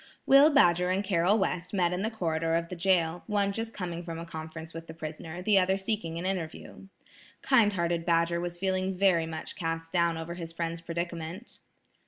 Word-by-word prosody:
Will 275 Hz, +3 st, +7 dB
Badger 180 Hz, -, +4 dB
and 190 Hz, +2 st, +1 dB
Carroll 190 Hz, +1 st, +2 dB
West 180 Hz, -2 st, -2 dB
met 180 Hz, -2 st, +2 dB
in 180 Hz, -, -2 dB
the 220 Hz, -, 0 dB
corridor 165 Hz, -6 st, -1 dB
of 170 Hz, 0 st, -1 dB
the 180 Hz, -, -5 dB
jail, 175 Hz, -2 st, +1 dB
one 205 Hz, -2 st, +1 dB
just 225 Hz, +2 st, -4 dB
coming 175 Hz, -4 st, -5 dB
from 165 Hz, -1 st, -6 dB
a 165 Hz, -, -6 dB
conference 160 Hz, 0 st, -8 dB
with 165 Hz, 0 st, -8 dB
the 160 Hz, -, -9 dB
prisoner, 160 Hz, +2 st, -7 dB
the 205 Hz, 0 st, +5 dB
other 190 Hz, +1 st, +2 dB
seeking 190 Hz, -4 st, -2 dB
an 170 Hz, -, -4 dB
interview. 185 Hz, 0 st, -5 dB, 0.6 s
Kind 235 Hz, -6 st, +4 dB
hearted 170 Hz, -2 st, 0 dB
Badger 170 Hz, 0 st, +2 dB
was 175 Hz, 0 st, -4 dB
feeling 190 Hz, 0 st, -1 dB
very 180 Hz, -4 st, +3 dB
much 160 Hz, -1 st, -6 dB
cast 165 Hz, -1 st, -4 dB
down 170 Hz, -2 st, +2 dB
over 165 Hz, +1 st, -5 dB
his 170 Hz, -2 st, -6 dB
friend's 165 Hz, 0 st, -3 dB
predicament. 170 Hz, +4 st, -5 dB
175 Hz, 195 wpm, -29 LUFS, 165-190 Hz, 0.6 s, Will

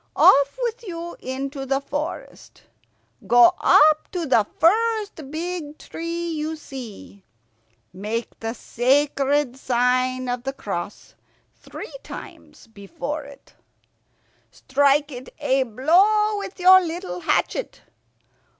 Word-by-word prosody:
Off 280 Hz, -, +5 dB
with 475 Hz, 0 st, -2 dB
you 345 Hz, -4 st, -7 dB
into 270 Hz, +2 st, -5 dB
the 270 Hz, 0 st, 0 dB
forest. 290 Hz, +3 st, -7 dB, 0.6 s
Go 245 Hz, +9 st, +6 dB
up 310 Hz, 0 st, +5 dB
to 355 Hz, -3 st, -3 dB
the 225 Hz, -7 st, +3 dB
first 420 Hz, -4 st, +1 dB
big 320 Hz, -1 st, -5 dB
tree 335 Hz, +1 st, -5 dB
you 315 Hz, 0 st, -3 dB
see. 240 Hz, -9 st, -10 dB, 0.7 s
Make 215 Hz, +5 st, -5 dB
the 225 Hz, +1 st, -4 dB
sacred 275 Hz, +2 st, +1 dB
sign 255 Hz, 0 st, 0 dB
of 245 Hz, 0 st, -2 dB
the 270 Hz, +2 st, -4 dB
cross 200 Hz, -5 st, -6 dB, 0.4 s
three -, -, -10 dB
times -, -, -11 dB
before 270 Hz, +8 st, -6 dB
it. 280 Hz, 0 st, -16 dB, 1.0 s
Strike 285 Hz, +2 st, +1 dB
it 250 Hz, 0 st, -9 dB
a 270 Hz, -3 st, +1 dB
blow 370 Hz, -, +3 dB
with 395 Hz, -1 st, -8 dB
your 375 Hz, +1 st, +8 dB
little 350 Hz, +2 st, -5 dB
hatchet. 355 Hz, +8 st, -1 dB
285 Hz, 110 wpm, -23 LUFS, 255-340 Hz, 1.0 s, your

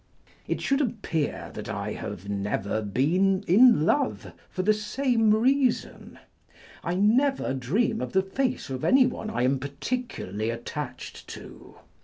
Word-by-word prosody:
It -, -, -2 dB
should 275 Hz, +1 st, +1 dB
appear 205 Hz, -, -2 dB
that -, -, -7 dB
I -, -, -3 dB
have 95 Hz, -, -7 dB
never 100 Hz, +1 st, -2 dB
been 175 Hz, -, +1 dB
in 205 Hz, -2 st, +6 dB
love, 105 Hz, -, 0 dB, 0.2 s
for 185 Hz, -, -3 dB
the 215 Hz, +3 st, +4 dB
same 225 Hz, +1 st, +1 dB
reason. 255 Hz, +3 st, +1 dB, 0.7 s
I 175 Hz, -, -1 dB
never 235 Hz, -, +2 dB
dream 210 Hz, -, 0 dB
of -, -, -4 dB
the 190 Hz, 0 st, +3 dB
face 255 Hz, -, -2 dB
of 130 Hz, -1 st, -4 dB
anyone 255 Hz, -4 st, +3 dB
I 170 Hz, -, -1 dB
am 130 Hz, +1 st, +2 dB
particularly 140 Hz, -, -4 dB
attached 120 Hz, +4 st, -6 dB
to. -, -, -11 dB
190 Hz, 135 wpm, -26 LUFS, -, 0.7 s, in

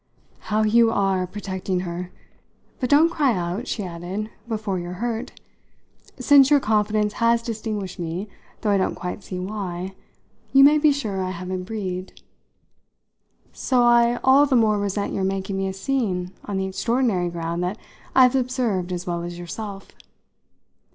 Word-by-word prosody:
"How 215 Hz, +1 st, +2 dB
you 230 Hz, +2 st, +5 dB
are 195 Hz, -4 st, +1 dB
protecting 190 Hz, -1 st, -3 dB
her! 175 Hz, 0 st, -5 dB, 0.7 s
But 250 Hz, -, -1 dB
don't 310 Hz, +4 st, +5 dB
cry 285 Hz, -7 st, +2 dB
out," 180 Hz, +7 st, -3 dB
she 210 Hz, -, -3 dB
added, 185 Hz, +5 st, -5 dB, 0.2 s
"before 210 Hz, -4 st, -2 dB
you're 175 Hz, +1 st, -6 dB
hurt. 230 Hz, +4 st, -4 dB, 0.8 s
Since 280 Hz, -2 st, +6 dB
your 295 Hz, -1 st, +6 dB
confidence 210 Hz, -2 st, +1 dB
has 230 Hz, 0 st, +3 dB
distinguished 215 Hz, -5 st, -4 dB
me 175 Hz, +4 st, -4 dB, 0.3 s
though 210 Hz, -, +1 dB
I 200 Hz, -, +4 dB
don't 185 Hz, -, 0 dB
quite 180 Hz, +2 st, -5 dB
see 185 Hz, -, -6 dB
why 185 Hz, -1 st, -4 dB, 0.6 s
you 275 Hz, 0 st, +8 dB
may 295 Hz, +2 st, +7 dB
be 300 Hz, 0 st, +5 dB
sure 215 Hz, -9 st, -2 dB
I 185 Hz, -, -2 dB
haven't 185 Hz, 0 st, -5 dB
breathed. 190 Hz, -3 st, -5 dB, 1.3 s
So 250 Hz, -2 st, +1 dB
I 240 Hz, 0 st, +4 dB
all 275 Hz, +2 st, +6 dB
the 270 Hz, -, +2 dB
more 215 Hz, -3 st, +3 dB
resent 200 Hz, 0 st, -2 dB
your 195 Hz, -, -1 dB
making 195 Hz, 0 st, -2 dB
me 195 Hz, 0 st, -1 dB
a 190 Hz, -, -3 dB
scene 190 Hz, -5 st, -1 dB
on 200 Hz, -2 st, -3 dB
the 190 Hz, -, -1 dB
extraordinary 200 Hz, -2 st, 0 dB
ground 170 Hz, 0 st, -3 dB
that 185 Hz, +4 st, -2 dB, 0.4 s
I've 255 Hz, -1 st, +6 dB
observed 245 Hz, -8 st, 0 dB
as 180 Hz, 0 st, -4 dB
well 175 Hz, -2 st, -2 dB
as 175 Hz, 0 st, -6 dB
yourself. 195 Hz, +3 st, -7 dB
205 Hz, 160 wpm, -23 LUFS, 185-235 Hz, 1.3 s, you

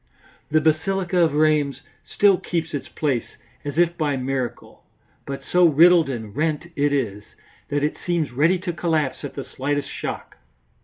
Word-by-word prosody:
The 155 Hz, +1 st, +3 dB
basilica 180 Hz, +4 st, +1 dB
of 165 Hz, -4 st, +3 dB
Rheims 150 Hz, -3 st, +2 dB, 0.3 s
still 200 Hz, -3 st, +3 dB
keeps 165 Hz, -2 st, -3 dB
its 135 Hz, -3 st, -4 dB
place 135 Hz, -7 st, -2 dB, 0.3 s
as 145 Hz, +1 st, -5 dB
if 170 Hz, 0 st, +3 dB
by 145 Hz, -3 st, 0 dB
miracle, 130 Hz, -1 st, -4 dB, 0.4 s
but 140 Hz, 0 st, -5 dB
so 180 Hz, -1 st, +4 dB
riddled 165 Hz, +1 st, +5 dB
and 110 Hz, -5 st, -6 dB
rent 155 Hz, +2 st, -1 dB
it 145 Hz, 0 st, +1 dB
is, 110 Hz, -8 st, -1 dB, 0.5 s
that 145 Hz, 0 st, 0 dB
it 150 Hz, -, -1 dB
seems 170 Hz, -6 st, -1 dB
ready 155 Hz, +9 st, +3 dB
to 180 Hz, -1 st, -4 dB
collapse 160 Hz, -5 st, -1 dB
at 140 Hz, -2 st, -6 dB
the 140 Hz, -, -4 dB
slightest 145 Hz, +2 st, -3 dB
shock. -, -, -6 dB
150 Hz, 160 wpm, -23 LUFS, 140-170 Hz, 0.5 s, riddled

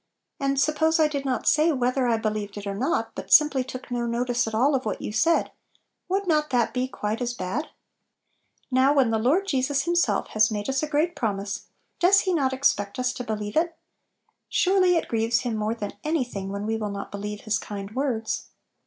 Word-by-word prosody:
And 275 Hz, 0 st, 0 dB
suppose 315 Hz, +3 st, +2 dB
I 310 Hz, -, +5 dB
did 280 Hz, -2 st, -4 dB
not 255 Hz, -2 st, -1 dB
say 310 Hz, +2 st, +4 dB
whether 255 Hz, -1 st, +1 dB
I 230 Hz, -1 st, +2 dB
believed 215 Hz, -2 st, -3 dB
it 205 Hz, -, -6 dB
or 200 Hz, -, -3 dB
not, 260 Hz, +11 st, -1 dB
but -, -, -8 dB
sim 300 Hz, 0 st, +7 dB
ply 265 Hz, -, 0 dB
took 255 Hz, 0 st, -8 dB
no 240 Hz, -1 st, -1 dB
notice 245 Hz, 0 st, 0 dB
at 220 Hz, -, -3 dB
all 270 Hz, +6 st, +3 dB
of 265 Hz, -1 st, 0 dB
what 215 Hz, -, -3 dB
you -, -, -5 dB
said, 330 Hz, +10 st, +2 dB, 0.6 s
would 390 Hz, +2 st, 0 dB
not 305 Hz, -3 st, +1 dB
that 245 Hz, -3 st, +1 dB
be 255 Hz, 0 st, 0 dB
quite 215 Hz, -2 st, -3 dB
as 240 Hz, 0 st, -2 dB
bad? 190 Hz, +11 st, -3 dB, 1.0 s
Now 260 Hz, +2 st, +4 dB
when 260 Hz, -5 st, +3 dB
the 220 Hz, -, +1 dB
Lord 295 Hz, -, +2 dB
Jesus 275 Hz, -4 st, 0 dB
Himself 345 Hz, +2 st, +1 dB
has 215 Hz, 0 st, +3 dB
made 210 Hz, +1 st, -3 dB
us 270 Hz, 0 st, 0 dB
a 305 Hz, -, -1 dB
great 315 Hz, +4 st, +1 dB
promise, 205 Hz, -3 st, -3 dB, 0.3 s
does 390 Hz, +2 st, +5 dB
He 370 Hz, -, 0 dB
not 275 Hz, -6 st, +1 dB
expect 205 Hz, -7 st, 0 dB
us 250 Hz, 0 st, 0 dB
to 250 Hz, -, -5 dB
believe 210 Hz, -2 st, -4 dB
it? 330 Hz, +1 st, +1 dB, 0.7 s
Surely 370 Hz, -1 st, +3 dB
it -, -, -2 dB
grieves 230 Hz, 0 st, +1 dB
Him 240 Hz, -3 st, -2 dB
more 215 Hz, +1 st, -1 dB
than 205 Hz, -3 st, -5 dB
any 310 Hz, -2 st, +1 dB
thing 200 Hz, -6 st, -6 dB
when 200 Hz, +1 st, -4 dB
we 225 Hz, +1 st, -1 dB
will 215 Hz, -1 st, -3 dB
not 200 Hz, 0 st, -6 dB
believe 205 Hz, +1 st, -5 dB
His 215 Hz, -1 st, 0 dB
kind 200 Hz, -1 st, -7 dB
words. 250 Hz, -4 st, -2 dB
250 Hz, 215 wpm, -25 LUFS, 215-300 Hz, 1.0 s, sim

